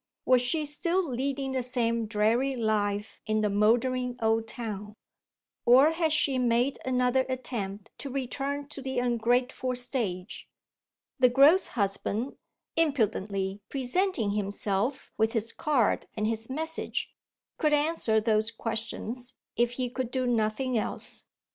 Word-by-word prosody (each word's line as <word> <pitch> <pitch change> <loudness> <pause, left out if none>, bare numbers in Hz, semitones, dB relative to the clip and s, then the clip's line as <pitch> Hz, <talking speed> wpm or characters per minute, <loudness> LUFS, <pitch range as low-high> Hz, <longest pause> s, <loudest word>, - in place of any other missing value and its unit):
Was 255 -1 +5
she 300 +5 0
still 340 +5 0
leading 270 +1 -2
the 260 -1 0
same 235 -2 0
dreary 230 +5 +1
life 210 -2 -1
in 215 0 +1
the 210 -1 +1
mouldering 245 +4 +2
old 225 0 +1
town? 210 -3 -6 0.7
Or 265 +6 +7
had 325 -1 +1
she 285 -3 +2
made 245 +2 +2
another 255 0 +2
attempt 210 -6 -4
to 280 - -5
return 275 +2 -3
to 295 -2 -6
the 265 -1 -4
ungrateful 245 +1 +1
stage? 230 -7 -2 0.7
The 250 -1 +6
gross 280 +9 +6
husband, 205 +5 -1 0.4
impudently 205 -10 0
presenting 270 - 0
himself 205 +4 -2
with 220 +1 +2
his 225 -1 0
card 275 -8 +1
and 210 0 -1
his 225 +1 -2
message, 320 +4 -3 0.5
could 305 -2 +2
answer 295 -7 +2
those 215 0 +2
questions 230 +2 -4 0.2
if 240 +1 +2
he 250 0 -2
could 250 0 -3
do 255 0 -1
nothing 235 +1 +1
else. - - -5
245 Hz, 130 wpm, -28 LUFS, 220-265 Hz, 0.7 s, Or